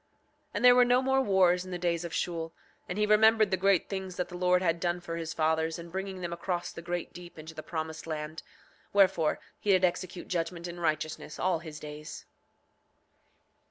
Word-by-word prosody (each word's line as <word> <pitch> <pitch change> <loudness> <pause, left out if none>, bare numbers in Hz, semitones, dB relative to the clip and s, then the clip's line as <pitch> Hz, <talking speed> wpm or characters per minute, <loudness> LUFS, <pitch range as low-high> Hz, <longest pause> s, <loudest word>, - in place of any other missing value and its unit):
7:27 - - -43 0.5
And - - +1
there 250 - +10
were 250 0 +6
no 245 +1 +3
more 265 0 +3
wars 185 -6 +3
in 185 - -10
the 180 - -3
days 175 -1 0
of 170 - -5
Shule; 165 -2 -2 0.4
and 180 - -3
he 210 - +3
remembered 215 0 +5
the - - +4
great 190 -1 +2
things 190 -2 -5
that 180 - -2
the 180 - -8
Lord 180 0 +2
had 170 -1 +1
done 175 0 0
for 170 -1 -6
his 165 -1 -4
fathers 160 0 +1
in 170 0 -9
bringing 190 0 -4
them 170 -1 -3
across 175 0 -3
the - - -8
great 175 0 -4
deep 175 -1 -11
into 160 +1 -9
the 155 - -7
promised 160 0 -5
land; 155 0 -4 0.5
wherefore 190 -6 +4 0.2
he 210 - -4
did 185 -1 +5
execute 180 0 -3
judgment 170 0 -2
in 175 0 -7
righteousness 155 -2 -2
all 180 -3 +1
his 160 -2 -9
days. 150 +1 -8
175 Hz, 205 wpm, -30 LUFS, 165-190 Hz, 0.5 s, there